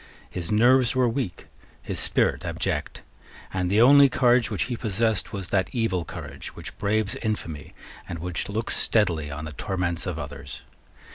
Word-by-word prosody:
His 85 -2 -4
nerves 120 +3 +4
were 130 -1 +3
weak, 115 - -3 0.3
his - - -4
spirit - - +1
abject; - - -3 0.5
and 90 -1 0
the 105 +4 +4
only 140 +3 +8
courage 120 -1 +3
which 105 - -1
he 125 - -3
possessed 110 -1 0
was 95 -4 -5
that 95 -1 +1
evil 110 -8 0
courage - - -8
which - - -8
braves 105 0 +1
infamy, 85 -9 -4 0.3
and 85 - -4
which 85 +3 -3
looks 110 +3 -2
steadily 85 -9 +2
on 75 +1 -6
the 75 - -6
torments 90 +1 -2
of 90 -3 -3
others. 70 -2 -7
100 Hz, 160 wpm, -25 LUFS, 85-115 Hz, 0.5 s, only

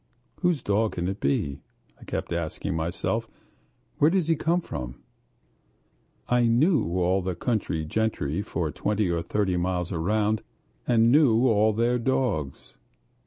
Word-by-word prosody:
"Whose 175 -7 +1
dog 105 +2 +1
can 85 0 -2
it 95 +2 -3
be?" 70 0 -1 0.4
I - - -14
kept - - -4
asking 85 -1 -3
myself. 80 +2 -2 0.7
"Where 150 - +6
does 175 -2 +1
he 165 - +4
come 165 +3 +1
from?" 65 - -6 1.3
I 125 -1 +3
knew 120 - +2
all 90 +2 +2
the 90 -1 -3
country 95 -10 -1
gentry 85 -4 -1
for 85 -6 -3
twenty 105 0 0
or 85 -1 0
thirty 95 +1 0
miles 90 0 -1
round, 105 +5 0 0.5
and 115 -1 +4
knew 130 -4 +5
all 110 -1 +4
their 120 +3 +1
dogs. 115 - -2
105 Hz, 140 wpm, -26 LUFS, 85-120 Hz, 1.3 s, Where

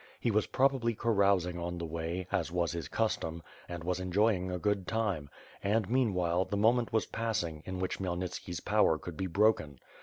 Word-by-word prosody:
He 120 - +1
was 105 0 +2
probably 130 -4 +2
carousing 100 -6 +2
on 85 0 -3
the 85 - -3
way, 85 +3 -3
as 90 -4 0
was 85 -1 0
his 85 -2 -4
custom, 85 -7 -1 0.3
and 85 -1 -5
was 90 +1 -1
enjoying 95 0 +1
a 90 - -2
good 100 0 0
time; 100 -11 -1 0.3
and 105 0 +1
meanwhile, 95 -8 +2
the 100 +2 -3
moment 115 +3 +3
was 110 - +2
passing, 90 -9 -2
in 95 0 -3
which 95 0 -2
Khmy 95 - -2
elnitski's 90 -1 -4
power 105 -6 +3
could 85 +2 -8
be 95 +4 -2
broken. 90 -6 +2
95 Hz, 185 wpm, -32 LUFS, 85-110 Hz, 0.3 s, moment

